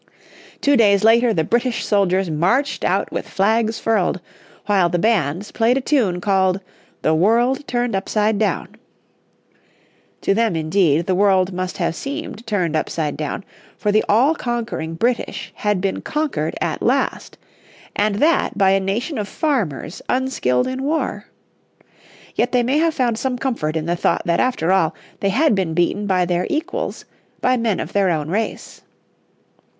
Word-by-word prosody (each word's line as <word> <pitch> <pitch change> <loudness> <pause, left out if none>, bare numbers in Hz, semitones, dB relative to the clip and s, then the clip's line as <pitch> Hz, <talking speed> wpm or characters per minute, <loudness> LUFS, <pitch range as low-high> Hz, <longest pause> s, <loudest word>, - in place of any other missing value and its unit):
Two 285 0 +4
days 205 -5 +4
later 230 +2 +5
the 165 -7 +1
British 240 +5 0
soldiers 195 -2 +2
marched 215 - +1
out - - 0
with - - -4
flags 220 +3 +1
furled, 205 -5 0 0.5
while 195 -4 +3
the 175 - 0
bands 190 -2 0
played 235 +3 +2
a - - +2
tune 245 -10 +1
called 190 0 +1 0.4
"The 155 - +3
World 235 - +2
Turned 240 -3 -1
Upside 210 +2 0
Down." 215 - 0 1.5
To - - +2
them 225 -3 +1
indeed 160 -1 +2
the 185 - +1
world 190 -1 +3
must 185 0 -4
have 170 -3 0
seemed 275 - -6
turned 180 -7 0
upside 155 -1 -2
down, 150 +5 -4 0.3
for 210 - 0
the 215 +1 +3
all 250 +9 +4
conquering 235 - -3
British 240 +8 -2
had 210 -2 0
been 195 +1 -2
conquered 285 - -2
at - - -2
last, - - -1 0.6
and 205 0 +1
that 305 +3 +2
by 195 -2 +4
a 195 - +3
nation 220 - -2
of 205 - -3
farmers 205 - -2
unskilled 250 - +1
in 260 +1 -3
war. 305 +4 -2 1.1
Yet 245 +2 0
they 245 -1 +3
may 265 +5 +1
have 325 0 +1
found 240 -4 0
some 255 0 -1
comfort 230 - -2
in 160 -1 -2
the 170 +1 0
thought 170 0 0
that 170 0 +1
after 215 -9 +1
all 190 -4 +2 0.2
they 195 - 0
had 275 +7 +3
been 185 -5 -1
beaten 190 +4 0
by 185 -2 +2
their 175 0 -1
equals, 365 +11 -3 0.3
by 255 - +2
men 230 -5 0
of - - -5
their 200 -2 +2
own 155 -3 -1
race. 220 +4 -3
205 Hz, 160 wpm, -20 LUFS, 180-245 Hz, 1.5 s, later